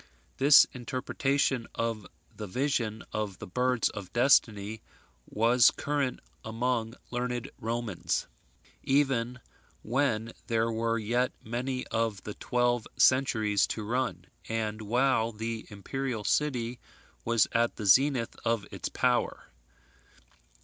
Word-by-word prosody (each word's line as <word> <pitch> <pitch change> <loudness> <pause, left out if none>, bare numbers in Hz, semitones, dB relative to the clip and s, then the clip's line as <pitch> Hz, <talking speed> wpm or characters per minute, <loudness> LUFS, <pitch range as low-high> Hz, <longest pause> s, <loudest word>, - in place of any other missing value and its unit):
This 140 +2 +8
interpretation 130 +1 -1
of 115 -4 -2 0.3
the 105 - -6
vision 115 -1 -1
of 105 -3 -3
the - - -8
birds 125 +5 +1
of 100 -4 -8
destiny 110 -4 +3 0.5
was 115 +2 +5
current 140 -3 -2 0.2
among 115 0 -1 0.2
learned 125 +1 -3
Romans, 115 -4 -2 0.6
even 130 -3 +1 0.4
when 115 -2 0
there 115 0 +1
were 115 +1 0
yet 120 +3 0
many 125 +3 -3
of 110 -3 -1
the 105 - -6
twelve 120 0 0
centuries 110 -6 +3
to 110 - -4
run, 115 -5 -2 0.2
and 110 -1 -2
while 115 +1 +2
the 115 +1 -5
imperial 115 +3 -4
city 125 -3 0 0.4
was 115 -1 +3
at 115 +1 +1
the 105 - -6
zenith 125 +3 +4
of 115 -3 0
its - - -4
power. - - 0
115 Hz, 115 wpm, -29 LUFS, 110-125 Hz, 0.6 s, This